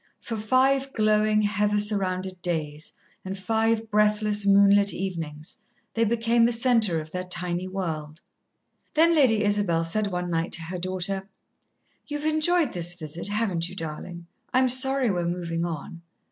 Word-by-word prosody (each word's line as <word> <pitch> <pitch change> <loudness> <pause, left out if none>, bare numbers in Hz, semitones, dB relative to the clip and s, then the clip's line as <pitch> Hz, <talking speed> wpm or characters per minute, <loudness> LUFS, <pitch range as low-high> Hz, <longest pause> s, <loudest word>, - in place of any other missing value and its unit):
For 230 - -5
five 265 +5 +1
glowing, 215 -1 +2
heather 205 0 +1
surrounded 190 -3 0
days 155 -3 -3 0.3
and 190 +1 -5
five 225 +2 0
breathless, 210 -1 +2
moonlit 200 0 +5
evenings, 165 -5 -5 0.3
they 230 0 +2
became 230 +1 +2
the 235 - +2
centre 230 -7 +2
of 155 0 -9
their 180 +1 -3
tiny 180 0 -2
world. 160 -5 -5 0.8
Then 330 +2 +5
Lady 245 -9 +3
Isabel 205 -5 +1
said 205 +6 0
one 180 -2 -3
night 165 +1 -1
to 170 - +1
her 175 +2 -5
daughter: 185 +2 -3 0.8
"You've 295 0 -4
enjoyed 310 0 +2
this 175 -1 -3
visit, 165 0 -5
haven't 200 -5 -1
you, 185 - -10
darlin'? 170 +1 -7 0.3
I'm 255 0 +3
sorry 260 -1 +3
we're 175 -2 -1
movin' 170 -1 -2
on." 165 0 -6
200 Hz, 145 wpm, -25 LUFS, 175-225 Hz, 0.8 s, moonlit